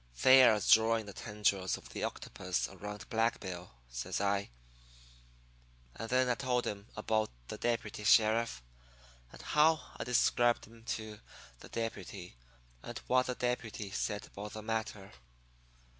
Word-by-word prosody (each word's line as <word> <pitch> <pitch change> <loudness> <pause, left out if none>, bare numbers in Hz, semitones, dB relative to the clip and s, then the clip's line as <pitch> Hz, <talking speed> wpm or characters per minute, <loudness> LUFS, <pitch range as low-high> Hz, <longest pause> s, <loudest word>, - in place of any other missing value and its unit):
"'They're 130 -4 +8
drawing 110 +1 +4
the 100 - -9
tendrils 100 -4 0
of - - -14
the - - -5
octopus - - -2
around 105 0 -8
Black 115 0 +1
Bill,' 90 -2 -7 0.2
says - - -4
I. 100 0 0 1.5
And 115 - -6
then 130 0 +3
I 125 - +3
told 125 0 0
him 100 0 -5
about 110 0 0 0.2
the - - -6
deputy 115 -3 -2
sheriff, 110 - +4 0.7
and - - -13
how 155 +1 +4 0.2
I'd - - -4
described 120 0 +3
him 115 0 -17
to 110 -2 -4 0.4
the - - -12
deputy, 100 - -5 0.5
and - - -7
what 130 0 +3
the 125 - -2
deputy 115 -5 -3
said 105 0 -2
about 105 +1 -8
the 110 - -7
matter. 110 -3 -3
110 Hz, 140 wpm, -33 LUFS, 105-120 Hz, 1.5 s, They're